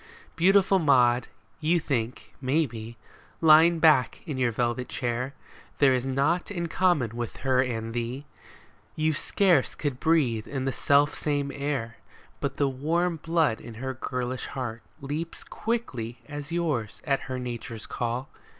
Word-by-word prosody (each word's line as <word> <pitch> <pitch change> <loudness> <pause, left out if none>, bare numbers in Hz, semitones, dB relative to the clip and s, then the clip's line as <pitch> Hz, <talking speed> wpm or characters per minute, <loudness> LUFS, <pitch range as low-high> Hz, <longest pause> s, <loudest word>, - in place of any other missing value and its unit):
Beautiful 195 +2 +4
Maud, 125 -6 +4 0.3
you 170 +2 +2
think, 125 -6 -3
maybe, 120 -5 -1 0.4
Lying 160 +1 +7
back 155 -5 +4
in 145 -6 -4
your 125 -2 +2
velvet 120 +2 -1
chair, 125 0 -2 0.4
There 140 -2 +5
is 130 0 -1
naught 140 +7 +1
in 175 -4 -3
common 155 - +1
with 120 -2 -4
her 130 -1 +4
and 115 -3 -3
thee, 120 +4 -3 0.4
— - - -25 0.3
You 155 0 +1
scarce 175 0 +2
could 140 -4 -3
breathe 130 -10 +2
in 135 -2 -3
the 135 - +1
self 145 +2 +3
same 145 -2 -1
air. 140 -5 -3 0.4
But 140 -1 -3
the 140 - +2
warm 165 +6 0
blood 160 -6 +1
in 115 -1 -9
her 130 +3 -4
girlish 125 0 -3
heart 120 -4 -5 0.2
Leaps 150 +4 -4
quick 235 +1 -2 0.4
as 145 0 -7
yours 150 -11 -1
at 140 -2 +2
her 130 - -2
nature's 120 -3 -5
call. 120 +2 -3
135 Hz, 150 wpm, -27 LUFS, 120-160 Hz, 0.4 s, Lying